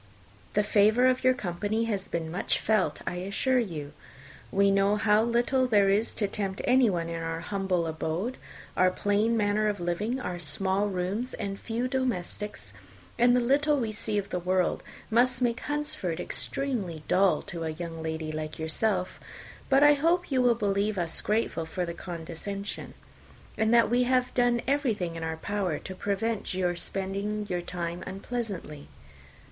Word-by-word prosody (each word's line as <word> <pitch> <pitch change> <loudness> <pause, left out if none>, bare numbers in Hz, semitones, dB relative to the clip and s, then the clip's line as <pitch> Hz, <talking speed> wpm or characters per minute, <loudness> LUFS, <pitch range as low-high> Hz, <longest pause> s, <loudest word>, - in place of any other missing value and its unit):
The 210 - +4
favour 215 +4 +4
of 255 0 +3
your 255 0 +5
company 205 +2 -1
has 205 -4 -2
been 160 -1 -3
much 190 +6 0
felt, 215 -3 +1
I 180 - -3
assure 200 +8 +1
you. 155 -10 -4 0.6
We 200 0 +4
know 195 +1 +3
how 210 0 +4
little 240 +3 +2
there 205 -4 +4
is 210 +3 +2
to 205 - +1
tempt 195 -1 -2
anyone 230 -10 +3
to 170 - -4
our 165 0 -3
humble 190 -2 -1
abode. 160 +9 -2 0.4
Our 185 0 +5
plain 205 +4 +1
manner 210 0 +2
of 205 -1 -1
living, 205 +9 -1
our 180 -8 -4
small 190 +6 0
rooms, 195 +6 -2
and 200 -2 -4
few 235 +2 -2
domestics, 235 -6 -3 0.5
and 245 +1 +6
the - - +4
little 290 +4 +3
we 230 -5 -1
see 215 0 -2
of 200 -1 -2
the 180 - -1
world, 185 +1 +1 0.3
must 245 +2 +3
make 240 -1 +1
Hunsford 290 - -2
extremely 200 - -2
dull 185 -4 +3
to 170 -1 -6
a 160 - -2
young 165 0 -6
lady 160 -1 -3
like 155 0 -5
yourself; 180 +4 -1 0.5
but 270 +1 +5
I 295 0 +8
hope 335 +4 +1
you 260 -1 +3
will 245 -1 +4
believe 205 -1 0
us 170 -2 0
grateful 210 -6 0
for 180 +2 -2
the 170 - -4
condescension, 175 +4 -6 0.6
and 220 0 +1
that 235 -1 +6
we 245 +1 +4
have 255 0 +1
done 245 -1 +2
everything 230 - 0
in 165 - -5
our 160 0 -3
power 190 -2 -1
to 190 - -7
prevent 200 +2 -2
you 180 -1 0
spending 200 +4 -3
your 180 -3 -1
time 175 0 -4
unpleasantly." 195 -7 -5
200 Hz, 165 wpm, -28 LUFS, 175-235 Hz, 0.6 s, I